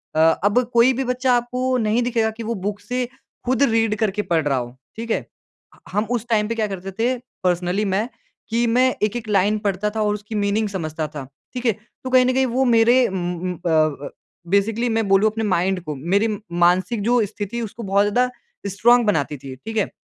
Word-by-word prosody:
अ, -, -, +2 dB, 0.2 s
अब 205 Hz, +4 st, +4 dB
कोई 240 Hz, +2 st, +5 dB
भी 265 Hz, +2 st, -1 dB
बच्चा 250 Hz, 0 st, +1 dB
आपको 250 Hz, +2 st, -1 dB
नहीं 220 Hz, +3 st, +2 dB
दिखेगा 230 Hz, -2 st, +1 dB
कि 230 Hz, -, -5 dB
वो 230 Hz, +1 st, -2 dB
बुक 205 Hz, 0 st, -3 dB
से 250 Hz, +4 st, -2 dB, 0.4 s
ख़ुद 255 Hz, +1 st, +2 dB
रीड 225 Hz, -1 st, +2 dB
करके 210 Hz, -2 st, 0 dB
पढ़ 170 Hz, -5 st, 0 dB
रहा 135 Hz, -2 st, +1 dB
हो, 120 Hz, 0 st, -5 dB, 0.2 s
ठीक 230 Hz, +1 st, -5 dB
है। -, -, +2 dB
ह -, -, -19 dB, 0.6 s
हम 210 Hz, +3 st, 0 dB
उस 240 Hz, -2 st, -1 dB
टाइम 210 Hz, -2 st, +2 dB
पे 230 Hz, -, -2 dB
क्या 220 Hz, -1 st, 0 dB
करते 195 Hz, -1 st, -6 dB
थे, 250 Hz, +3 st, +1 dB, 0.3 s
पर्सनली 180 Hz, +2 st, +1 dB
मैं, 200 Hz, +3 st, 0 dB, 0.4 s
कि 235 Hz, +1 st, +1 dB
मैं 255 Hz, +3 st, +3 dB
एक-एक 220 Hz, +2 st, -1 dB
लाइन 205 Hz, +1 st, +3 dB
पढ़ता 200 Hz, +1 st, 0 dB
था 220 Hz, -, 0 dB
और 210 Hz, 0 st, +1 dB
उसकी 210 Hz, +1 st, -6 dB
मीनिंग 205 Hz, +1 st, +1 dB
समझता 160 Hz, -5 st, -3 dB
था, 150 Hz, -2 st, -7 dB, 0.3 s
ठीक 250 Hz, -1 st, -5 dB
है। 230 Hz, -, +5 dB, 0.3 s
तो 260 Hz, -, -4 dB
कहीं 255 Hz, 0 st, +5 dB
न 255 Hz, -, +2 dB
कहीं 265 Hz, +1 st, +2 dB
वो 255 Hz, +1 st, +1 dB
मेरे 240 Hz, +1 st, +5 dB
उम, 180 Hz, -2 st, -3 dB
उम, 180 Hz, 0 st, -2 dB
अ -, -, +1 dB
अ, 155 Hz, -3 st, +1 dB, 0.4 s
बेसिकली 215 Hz, +6 st, +1 dB
मैं 225 Hz, -2 st, 0 dB
बोलूँ 195 Hz, +2 st, +4 dB
अपने 220 Hz, +1 st, -3 dB
माइंड 190 Hz, -2 st, +1 dB
को, 150 Hz, -3 st, -5 dB
मेरी 185 Hz, +10 st, +1 dB, 0.4 s
मानसिक 185 Hz, +6 st, +2 dB
जो 235 Hz, 0 st, +3 dB
स्थिति 210 Hz, +3 st, -5 dB
उसको 230 Hz, +1 st, -6 dB
बहुत 200 Hz, 0 st, +2 dB
ज़्यादा 245 Hz, +5 st, +2 dB, 0.4 s
स्ट्रॉन्ग 235 Hz, +5 st, +4 dB
बनाती 150 Hz, -6 st, 0 dB
थी, 135 Hz, 0 st, -9 dB
ठीक 220 Hz, -, -7 dB
है। 210 Hz, -, +1 dB
210 Hz, 215 wpm, -21 LUFS, 190-235 Hz, 0.6 s, कोई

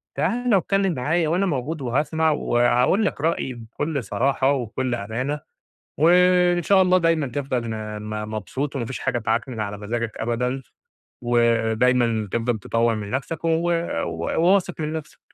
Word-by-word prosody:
تعالَ 245 Hz, -1 st, +1 dB
واتكلم 195 Hz, 0 st, +1 dB
معايا 160 Hz, +5 st, 0 dB
وأنا 180 Hz, +4 st, +1 dB
موجود 150 Hz, -1 st, -2 dB
وهاسمع 155 Hz, +5 st, +1 dB
وهاقول 125 Hz, -, +2 dB
لك 165 Hz, -, -2 dB
رأيي 160 Hz, -4 st, 0 dB
بكل 125 Hz, +5 st, -4 dB
صراحة 135 Hz, +3 st, +1 dB
وبكل 130 Hz, -1 st, -1 dB
أمانة، 120 Hz, +7 st, -3 dB, 0.6 s
و 155 Hz, +3 st, +5 dB, 0.5 s
إن 175 Hz, -, -1 dB
شاء 190 Hz, +3 st, +4 dB
الله 185 Hz, 0 st, +4 dB
دايمًا 165 Hz, -4 st, +2 dB
تفضل 125 Hz, -3 st, -3 dB
آآ، 105 Hz, -1 st, -5 dB, 0.3 s
مبسوط 110 Hz, +7 st, -4 dB
وما 125 Hz, -, -2 dB
فيش 130 Hz, -, -5 dB
حاجة -, -, -1 dB
تعكنن 115 Hz, +1 st, -2 dB
على 105 Hz, -1 st, -4 dB
مزاجك 115 Hz, +2 st, -3 dB
أبدًا، 125 Hz, +3 st, -2 dB, 0.6 s
ودايمًا 115 Hz, -1 st, +2 dB
تفضل 115 Hz, 0 st, 0 dB
تطوّر 115 Hz, +3 st, +1 dB
من 105 Hz, -2 st, -5 dB
نفسك 145 Hz, +7 st, -4 dB
و -, -, +2 dB, 0.6 s
وواثق 180 Hz, 0 st, +1 dB
من 155 Hz, 0 st, -2 dB
نفسك. 155 Hz, -1 st, -7 dB
130 Hz, 145 wpm, -23 LUFS, 115-160 Hz, 0.6 s, و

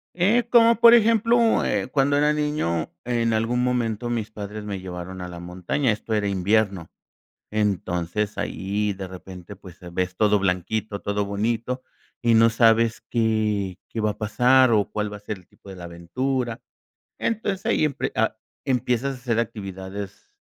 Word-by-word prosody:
Eh, 215 Hz, +7 st, +3 dB
como, 235 Hz, -1 st, +6 dB
por 235 Hz, 0 st, +9 dB
ejemplo, 230 Hz, +1 st, +3 dB
eh, 100 Hz, +1 st, 0 dB
cuando 145 Hz, 0 st, +2 dB
era 150 Hz, +1 st, +3 dB
niño, 150 Hz, -, -1 dB
en 115 Hz, -1 st, +1 dB
algún 115 Hz, +3 st, +1 dB
momento 120 Hz, -2 st, -1 dB
mis 110 Hz, -2 st, -2 dB
padres 105 Hz, 0 st, -7 dB
me 100 Hz, -2 st, -4 dB
llevaron 90 Hz, 0 st, -7 dB
a 90 Hz, -, -5 dB
la 85 Hz, -1 st, -8 dB
montaña, 90 Hz, +9 st, -1 dB
esto 110 Hz, +1 st, -4 dB
era 105 Hz, -1 st, 0 dB
invierno. 100 Hz, -2 st, +1 dB, 0.6 s
Entonces, 100 Hz, -1 st, -1 dB
ahí 100 Hz, +2 st, -2 dB
de 95 Hz, 0 st, -7 dB
repente, 95 Hz, +1 st, -10 dB
pues, 95 Hz, -3 st, -14 dB
se 90 Hz, -, -11 dB
ves 90 Hz, +1 st, -2 dB
todo 105 Hz, 0 st, +3 dB
blanquito, 100 Hz, +3 st, -2 dB
todo 100 Hz, 0 st, -1 dB
bonito, 115 Hz, +5 st, -2 dB, 0.4 s
y 115 Hz, -1 st, +3 dB
no 115 Hz, +1 st, +6 dB
sabes 115 Hz, 0 st, +3 dB
qué 110 Hz, -5 st, 0 dB
qué 115 Hz, -, -4 dB
va 105 Hz, 0 st, +1 dB
a -, -, -12 dB
pasar, 125 Hz, +3 st, +4 dB
o 105 Hz, -2 st, +3 dB
cuál 105 Hz, -1 st, -2 dB
va 105 Hz, -, -6 dB
a -, -, -15 dB
ser 105 Hz, 0 st, -6 dB
el 90 Hz, -, -19 dB
tipo -, -, -17 dB
de 95 Hz, -, -8 dB
la 90 Hz, -1 st, -9 dB
aventura. 115 Hz, +9 st, -3 dB, 0.6 s
Entonces, 205 Hz, -4 st, -2 dB
ahí -, -, +2 dB
empie 145 Hz, -3 st, -2 dB, 0.6 s
empiezas 130 Hz, +1 st, 0 dB
a -, -, -12 dB
hacer 120 Hz, -2 st, -1 dB
actividades 100 Hz, -3 st, -6 dB
110 Hz, 165 wpm, -24 LUFS, 95-125 Hz, 0.6 s, por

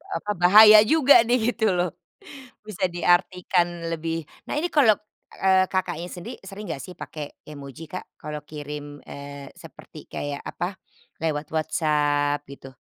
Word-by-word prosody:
apa, 210 Hz, -, -3 dB
bahaya 210 Hz, +4 st, +9 dB
juga 285 Hz, -4 st, +6 dB
nih, 240 Hz, -1 st, +2 dB
gitu 220 Hz, -2 st, 0 dB
loh. 180 Hz, 0 st, 0 dB, 0.7 s
Bisa 210 Hz, -3 st, -2 dB
diartikan 175 Hz, -1 st, +1 dB
lebih. 165 Hz, 0 st, -3 dB, 0.2 s
Nah -, -, -3 dB
ini 350 Hz, -, -1 dB
kalau, 240 Hz, -9 st, +5 dB, 0.5 s
eee, 190 Hz, 0 st, +5 dB
Kakaknya 175 Hz, -2 st, -2 dB
sendiri, 175 Hz, -, -8 dB
sering 195 Hz, +2 st, -9 dB
enggak 135 Hz, -, -5 dB
sih 180 Hz, -, -10 dB
pakai 150 Hz, -2 st, -7 dB, 0.2 s
emoji, 140 Hz, 0 st, -9 dB
Kak? 185 Hz, -, -6 dB, 0.2 s
Kalau 150 Hz, -2 st, -6 dB
kirim, 145 Hz, -1 st, -8 dB
eee, 140 Hz, -1 st, -9 dB
seperti -, -, -13 dB
kayak 145 Hz, -1 st, -5 dB
apa, 190 Hz, +2 st, -4 dB, 0.4 s
lewat 150 Hz, -2 st, -2 dB
WhatsApp, 145 Hz, -2 st, +1 dB
gitu? 135 Hz, -2 st, -12 dB
170 Hz, 140 wpm, -24 LUFS, 145-190 Hz, 0.7 s, bahaya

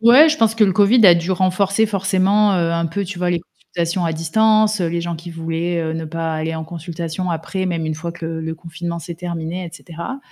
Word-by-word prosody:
Ouais, 250 Hz, +8 st, +8 dB
je 310 Hz, -, +1 dB
pense 225 Hz, -5 st, +2 dB
que 225 Hz, -1 st, +4 dB
le 195 Hz, -, +2 dB
covid 210 Hz, +4 st, +5 dB
a 175 Hz, -, +9 dB
dû 170 Hz, +2 st, -1 dB
renforcer 190 Hz, +3 st, +2 dB
forcément, 195 Hz, +1 st, +2 dB
heu, 170 Hz, -2 st, +1 dB
un 170 Hz, 0 st, 0 dB
peu, 200 Hz, +5 st, -3 dB
tu 185 Hz, -1 st, -7 dB
vois 180 Hz, 0 st, 0 dB
les 175 Hz, -2 st, 0 dB
consultations 170 Hz, +1 st, -4 dB
à 165 Hz, -, 0 dB
distance, 215 Hz, +6 st, +2 dB
heu, 175 Hz, -, +1 dB
les 170 Hz, +1 st, -2 dB
gens 170 Hz, 0 st, -3 dB
qui 170 Hz, +2 st, -9 dB
voulaient, 165 Hz, +1 st, -2 dB
heu, 160 Hz, -1 st, -2 dB
ne 160 Hz, 0 st, -4 dB
pas 165 Hz, +1 st, -3 dB
aller 160 Hz, +1 st, -2 dB
en 160 Hz, 0 st, -4 dB
consultation 170 Hz, +2 st, -5 dB
après 170 Hz, +3 st, -3 dB
même 170 Hz, -3 st, -2 dB
une 155 Hz, -, -2 dB
fois 165 Hz, +2 st, -5 dB
que 170 Hz, -2 st, -7 dB
le 160 Hz, 0 st, -4 dB
le 160 Hz, 0 st, -4 dB
confinement 170 Hz, +1 st, -6 dB
s'est 170 Hz, +1 st, -7 dB
terminé, 170 Hz, +1 st, -5 dB
et 170 Hz, -, -7 dB
cetera. 170 Hz, -, -7 dB
170 Hz, 245 wpm, -19 LUFS, 165-195 Hz, -, a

